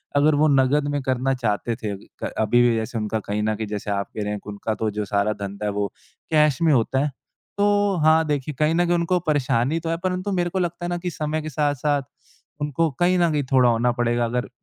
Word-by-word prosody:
अगर 145 +1 +4
वो 155 +2 +4
नकद 140 +1 +3
में 145 - -1
करना 130 +1 +1
चाहते 115 -1 -1
थे 110 -3 -4 0.3
क - - -1
अभी 110 +3 +3
भी 120 -1 +4
जैसे 110 +1 -3
उनका 110 0 -1
कहीं 105 +1 -1
न 110 0 0
कहीं 110 0 -4
जैसे 105 0 -4
आप 100 0 -1
कह - - -1
रहे 105 - -2
हैं 105 - -4
उनका 105 +2 -3
तो 110 0 -1
जो 105 0 -3
सारा 100 +2 +1
धंधा 100 +1 -5
है 105 - 0
वो 100 0 -1 0.4
कैश 150 -2 +3
में 160 -2 +4
होता 130 +2 +2
है। - - -1 0.5
तो 205 -1 +2
हाँ, 160 +1 +5
देखिए 145 0 -2
कहीं 155 +2 +2
न 175 +1 +3
कहीं 175 0 +2
उनको 175 +1 +1
परेशानी 145 0 +1
तो 165 - -4
है 165 - 0
परंतु 185 +2 -1
मेरे 175 -2 0
को 190 - -2
लगता 175 0 -2
है - - -2
ना 175 - -1
कि 180 +1 -3
समय 155 0 -2
के 155 - -5
साथ-साथ 145 -1 0 0.6
उनको 150 +3 +1
कहीं 180 +1 +3
न 170 -2 +3
कहीं 145 -2 0
थोड़ा 125 -2 +5
होना 120 +1 +2
पड़ेगा। 120 -1 +1
अगर 120 +2 -2
140 Hz, 240 wpm, -23 LUFS, 110-160 Hz, 0.6 s, हाँ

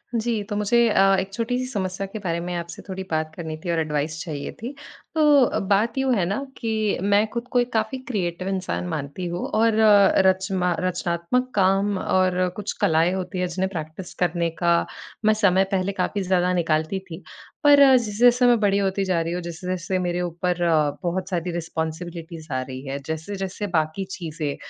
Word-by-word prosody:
जी, 225 -1 0
तो 205 - -5
मुझे 230 +3 +3
अ, 195 -1 +4
1 190 +1 -4
छोटी-सी 245 +3 -1
समस्या 195 -5 -3
के 215 +3 -7
बारे 170 -4 -2
में 175 +1 -4
आपसे 170 0 -6
थोड़ी 190 -1 -5
बात 155 0 -1
करनी 160 -2 -5
थी 175 - -1
और 165 - +1
एडवाइस 155 0 -2
चाहिए 150 -4 -5
थी। 245 +5 -5 0.4
तो 290 -7 +4
बात 210 +5 +2
यूँ 265 -1 +2
है 190 -5 +1
न, 195 +7 -1 0.2
कि 220 -3 -1
मैं 205 +2 +3
खुद 235 +1 -4
को 245 - +3
एक 245 0 0
काफ़ी 220 +3 0
क्रिएटिव 185 -6 -2
इंसान 190 -1 -2
मानती 155 +1 -4
हूँ। 175 +1 -3
और 225 +1 +2 0.5
रचना 190 -1 +2
रचनात्मक 180 +7 -1
काम 195 +1 +2
और 185 -1 +1
कुछ 210 -1 -4
कलाएँ 165 +2 +3
होती 185 -1 -4
हैं 180 - 0
जिन्हें 185 +2 -2
प्रैक्टिस 160 +1 -7
करने 170 -1 +1
का 170 -1 +3 0.4
मैं 215 - +6
समय 195 -3 +3
पहले 190 0 0
काफ़ी 205 - -1
ज़्यादा 180 -1 +2
निकालती 165 +1 0
थी। 165 +2 -8 0.4
पर 290 -1 +7 0.2
जैसे-जैसे 240 +2 +3
मैं 240 -2 +5
बड़ी 200 -2 +2
होती 195 0 0
जा 185 -3 +1
रही 165 +1 -2
हूँ, 180 - -3
जैसे-जैसे 180 +2 -3
मेरे 175 -1 -1
ऊपर 175 +1 -1 0.5
बहुत 180 +2 -2
सारी 180 -1 -2
रिस्पॉन्सिबिलिटीज़ 165 -1 -5
आ 130 - 0
रही 130 0 -7
हैं। 135 +1 -3
जैसे-जैसे 190 +6 -4
बाकी 155 +4 0
चीज़ें 155 -5 -4
185 Hz, 180 wpm, -23 LUFS, 170-205 Hz, 0.5 s, पर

